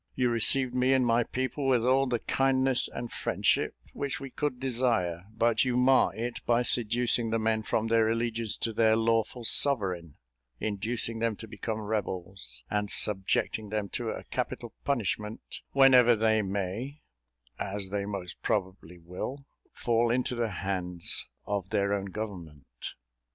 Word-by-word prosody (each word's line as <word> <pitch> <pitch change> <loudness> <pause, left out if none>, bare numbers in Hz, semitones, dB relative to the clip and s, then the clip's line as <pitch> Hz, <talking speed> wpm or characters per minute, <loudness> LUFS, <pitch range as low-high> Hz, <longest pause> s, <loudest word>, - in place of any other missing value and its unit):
You 125 -2 +1
received 125 +2 +4
me 130 +1 +2
and 130 -1 +3
my 115 0 +3
people 130 +3 -3
with 125 -3 +3
all 135 +2 +3
the 120 -1 0
kindness 130 +1 +2
and 120 -1 -6
friendship - - 0 0.2
which 140 -1 -3
we 135 -2 -8
could 145 -3 -3
desire; 115 -9 0
but 110 +1 +2
you 125 -2 0
mar 130 +1 +4
it, 120 +2 -4
by 120 0 +3
seducing 120 0 +2
the 115 - +1
men 110 0 0
from 110 +1 -1
their 115 -1 +3
allegiance 115 -1 -1
to 115 - -1
their 110 0 +4
lawful 115 +1 0
sovereign, 95 - +3 0.4
inducing 110 +2 -1
them 115 -1 0
to 110 - -9
become 110 +1 -4
rebels, 95 -3 -2
and 105 -1 -2
subjecting 105 +2 +1
them 105 -1 -2
to - - -3
a - - -5
capital - - -4
punishment 110 - -3
whenever 130 -3 +6
they 110 0 +2
may 100 +9 -4 0.6
(as 100 -1 -3
they 100 -1 -1
most 95 -3 -6
probably 95 -3 -3
will) 90 +11 -7 0.3
fall 120 0 +1
into 125 +1 0
the 120 -2 -1 0.2
hands 90 -3 -2 0.2
of 100 -2 -3
their 100 -1 +1
own 100 -1 -2
government." 90 -8 -8
115 Hz, 150 wpm, -28 LUFS, 100-125 Hz, 0.6 s, whenever